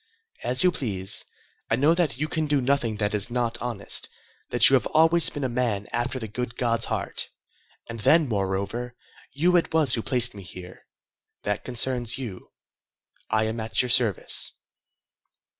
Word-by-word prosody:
"As 125 Hz, +5 st, +1 dB
you 180 Hz, -, +5 dB
please. 100 Hz, -, -1 dB, 0.4 s
I -, -, +3 dB
know 145 Hz, +7 st, +3 dB
that 170 Hz, -8 st, 0 dB
you 155 Hz, +3 st, -2 dB
can 155 Hz, -1 st, -2 dB
do 145 Hz, -1 st, +2 dB
nothing 125 Hz, -4 st, 0 dB
that 105 Hz, 0 st, -1 dB
is 105 Hz, +2 st, 0 dB
not 120 Hz, -1 st, -2 dB
honest, 120 Hz, -1 st, -1 dB, 0.4 s
that -, -, +6 dB
you -, -, +4 dB
have -, -, +3 dB
always 165 Hz, +2 st, +4 dB
been 145 Hz, -, -6 dB
a -, -, +1 dB
man 120 Hz, -5 st, -1 dB
after 120 Hz, +2 st, -1 dB
the 115 Hz, -3 st, -5 dB
good 120 Hz, +2 st, -5 dB
God's 115 Hz, -2 st, 0 dB
heart. -, -, -3 dB, 0.6 s
And 115 Hz, -1 st, -7 dB
then, 155 Hz, +7 st, +4 dB
moreover, 100 Hz, +3 st, -3 dB, 0.4 s
you 175 Hz, +6 st, +2 dB
it 170 Hz, -, 0 dB
was 155 Hz, -6 st, +3 dB
who 115 Hz, -, +1 dB
placed 120 Hz, -1 st, +2 dB
me 100 Hz, -, -10 dB
here. 90 Hz, 0 st, -11 dB, 0.6 s
That 105 Hz, 0 st, -2 dB
concerns 120 Hz, -1 st, 0 dB
you. 115 Hz, -9 st, -8 dB, 0.8 s
I 110 Hz, 0 st, +2 dB
am 110 Hz, +1 st, -3 dB
at 110 Hz, +2 st, +1 dB
your 125 Hz, -, -4 dB
service." 115 Hz, -6 st, +2 dB
120 Hz, 170 wpm, -25 LUFS, 110-135 Hz, 0.8 s, that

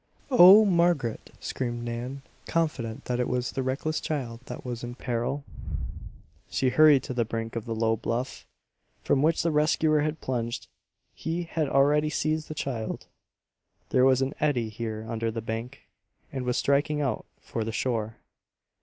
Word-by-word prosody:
"Oh, 210 Hz, -2 st, +9 dB
Margaret!" 170 Hz, -, +1 dB
screamed 120 Hz, -2 st, -3 dB
Nan, 120 Hz, +3 st, -5 dB, 0.2 s
confident 140 Hz, -7 st, -1 dB
that 125 Hz, 0 st, -1 dB
it 125 Hz, -, +1 dB
was 125 Hz, 0 st, -1 dB
the 135 Hz, -, -2 dB
reckless 135 Hz, +4 st, -1 dB
child 125 Hz, -7 st, -3 dB
that -, -, -7 dB
was 120 Hz, -1 st, -4 dB
in 120 Hz, 0 st, -5 dB
peril. 125 Hz, +3 st, -2 dB, 1.1 s
She 130 Hz, -, +1 dB
hurried 150 Hz, -1 st, +6 dB
to -, -, -4 dB
the 120 Hz, -1 st, +1 dB
brink 115 Hz, 0 st, -4 dB
of 115 Hz, -, -3 dB
the 115 Hz, -, -3 dB
low 115 Hz, 0 st, +2 dB
bluff, 120 Hz, +3 st, -3 dB, 0.6 s
from 135 Hz, -, +2 dB
which 160 Hz, +2 st, +2 dB
the 165 Hz, -, +2 dB
rescuer 155 Hz, 0 st, +3 dB
had 155 Hz, +1 st, -1 dB
plunged. 120 Hz, -2 st, -3 dB, 0.5 s
He 165 Hz, +2 st, -3 dB
had 160 Hz, -3 st, -1 dB
already 145 Hz, +3 st, +3 dB
seized 155 Hz, +1 st, -1 dB
the 155 Hz, -, -6 dB
child 120 Hz, -7 st, -3 dB, 0.8 s
(there 130 Hz, -, +4 dB
was 130 Hz, 0 st, +5 dB
an 135 Hz, +2 st, -2 dB
eddy 130 Hz, -7 st, +1 dB
here 110 Hz, 0 st, -5 dB
under 115 Hz, 0 st, -1 dB
the 115 Hz, +1 st, -3 dB
bank) 115 Hz, +4 st, -5 dB, 0.5 s
and 130 Hz, -2 st, -4 dB
was 125 Hz, -1 st, 0 dB
striking 145 Hz, +2 st, +2 dB
out 140 Hz, -3 st, -1 dB
for 115 Hz, -, -4 dB
the 110 Hz, -, -3 dB
shore. 115 Hz, -2 st, -1 dB
130 Hz, 165 wpm, -27 LUFS, 115-150 Hz, 1.1 s, Oh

